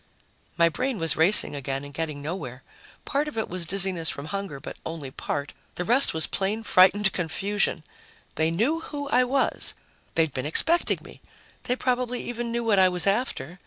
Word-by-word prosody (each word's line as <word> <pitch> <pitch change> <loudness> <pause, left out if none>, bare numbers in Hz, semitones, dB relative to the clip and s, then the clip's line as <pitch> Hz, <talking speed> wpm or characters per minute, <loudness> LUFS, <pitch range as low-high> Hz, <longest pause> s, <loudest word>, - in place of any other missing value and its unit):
My 170 -1 +5
brain 250 +9 -2
was 165 -4 +1
racing 165 -1 +4
again 135 0 -3
and 145 - -11
getting 150 -2 -4
nowhere. 145 -6 -5 0.4
Part 290 +1 0
of 300 - -6
it 220 - -1
was 175 -2 -4
dizziness 185 -3 +2
from 140 - -5
hunger, 195 -8 -4
but 140 - -8
only 160 -5 -6
part. 140 +2 -4 0.2
The 180 - -3
rest 245 +6 +5
was 160 0 +2
plain 205 +3 -2
frightened 195 0 +5
confusion. 195 0 -1 0.5
They 160 +1 +1
knew 230 - +1
who 290 -3 -6
I 255 - +4
was. 265 +2 0 0.4
They'd 160 -4 +2
been 130 +1 -3
expecting 335 - +2
me. - - -14 0.4
They 250 - +1
probably 250 -1 -1
even 240 -1 -4
knew 235 0 -1
what 215 -4 +3
I 185 -1 +6
was 180 -1 0
after. 200 -4 -1
190 Hz, 180 wpm, -26 LUFS, 160-235 Hz, 0.5 s, I